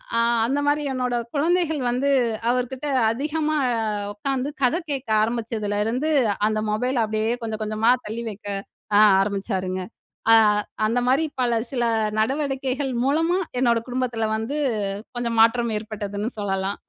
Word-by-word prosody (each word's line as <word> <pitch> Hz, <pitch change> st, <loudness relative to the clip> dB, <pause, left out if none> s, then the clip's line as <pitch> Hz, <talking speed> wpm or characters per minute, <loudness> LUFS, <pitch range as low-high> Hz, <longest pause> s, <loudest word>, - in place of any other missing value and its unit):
அ -, -, +4 dB, 0.3 s
அந்தமாரி, 290 Hz, +3 st, +1 dB
என்னோட 250 Hz, -1 st, -1 dB, 0.2 s
குழந்தைகள் 320 Hz, 0 st, +1 dB
வந்து 260 Hz, +3 st, 0 dB, 0.4 s
அவர்கிட்ட 250 Hz, +3 st, -1 dB, 0.3 s
அதிகமா 305 Hz, +4 st, -1 dB, 0.6 s
உக்கார்ந்து 270 Hz, +5 st, -2 dB
கதை 255 Hz, +7 st, +3 dB
கேக்க 270 Hz, -4 st, -4 dB
ஆரம்பிச்சதுலருந்து, 225 Hz, +3 st, -1 dB, 0.4 s
அந்த 215 Hz, 0 st, 0 dB
மொபைல் 250 Hz, +4 st, 0 dB
அப்பிடியே 220 Hz, +2 st, 0 dB
கொஞ்சம் 220 Hz, -1 st, -4 dB
கொஞ்சமா 215 Hz, +2 st, +2 dB, 0.2 s
தள்ளி 230 Hz, +2 st, -4 dB
வைக்க 205 Hz, -1 st, -10 dB, 0.5 s
ஆ -, -, +7 dB, 0.2 s
ஆரம்பிச்சாருங்க. 195 Hz, -2 st, -2 dB, 0.5 s
அ -, -, +9 dB, 0.5 s
அந்தமாரி 245 Hz, +6 st, +2 dB
பல 245 Hz, -1 st, +2 dB, 0.2 s
சில 245 Hz, -3 st, -1 dB, 0.4 s
நடவடிக்கைகள் 270 Hz, +2 st, -1 dB
மூலமா, 325 Hz, +6 st, +2 dB, 0.2 s
என்னோட 235 Hz, -2 st, +3 dB
குடும்பத்துல 245 Hz, -3 st, -1 dB
வந்து 225 Hz, +6 st, -3 dB, 0.6 s
கொஞ்சம் 235 Hz, -1 st, -2 dB
மாற்றம் 235 Hz, +1 st, +3 dB
ஏற்பட்டதுன்னு 210 Hz, 0 st, -4 dB
சொல்லலாம். 195 Hz, 0 st, -1 dB
240 Hz, 115 wpm, -23 LUFS, 215-270 Hz, 0.6 s, அ